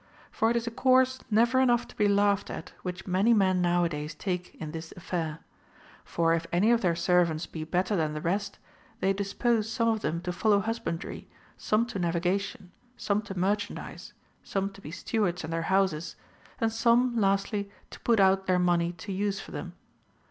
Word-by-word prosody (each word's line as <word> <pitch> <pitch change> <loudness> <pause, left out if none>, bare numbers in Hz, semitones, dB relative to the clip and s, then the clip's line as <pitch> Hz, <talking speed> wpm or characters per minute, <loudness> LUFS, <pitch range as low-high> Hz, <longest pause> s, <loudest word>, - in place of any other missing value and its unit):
For 225 - +1
it 235 - +1
is 235 -1 0
a 235 - -3
course 260 +1 +3
never 235 +4 +3
enough 240 -2 +3
to - - -15
be 210 - +2
laughed 200 0 +2
at - - -7
which 180 0 -5
many 195 +5 +3
men 185 -3 +3
nowadays 170 -3 0
take 180 +1 -4
in 155 -1 -6
this 165 0 -7
affair; 165 -3 -3 0.6
for 165 -1 +1
if 165 0 -1
any 195 +7 +3
of 235 -1 +3
their 175 -3 +2
servants 170 -2 +2
be 160 - -6
better 180 +5 0
than 155 -4 0
the - - -2
rest, 195 +5 -2 0.4
they 195 - +2
dispose 210 +3 0
some 230 -1 +1
of 220 -1 +1
them 160 +2 -1
to 180 0 -3
follow 205 +2 +3
husbandry, 210 -5 -4 0.3
some 215 +2 +1
to 235 -4 -5
navigation, 180 +2 -1 0.3
some 205 0 0
to 200 -3 -8
merchandise, 205 +3 -3 0.3
some 195 0 -2
to 200 - -14
be 150 - -8
stewards 185 0 -1
in 155 - -5
their 165 0 -1
houses, 185 -4 +1 0.4
and 225 -1 +1
some, 235 +2 +3
lastly, 200 0 +1 0.2
to - - -10
put 230 -3 +2
out 195 0 +4
their 185 -1 +3
money 175 -1 +2
to 180 +4 -8
use 200 +1 -1
for - - -10
them. - - -6
195 Hz, 185 wpm, -28 LUFS, 175-215 Hz, 0.6 s, out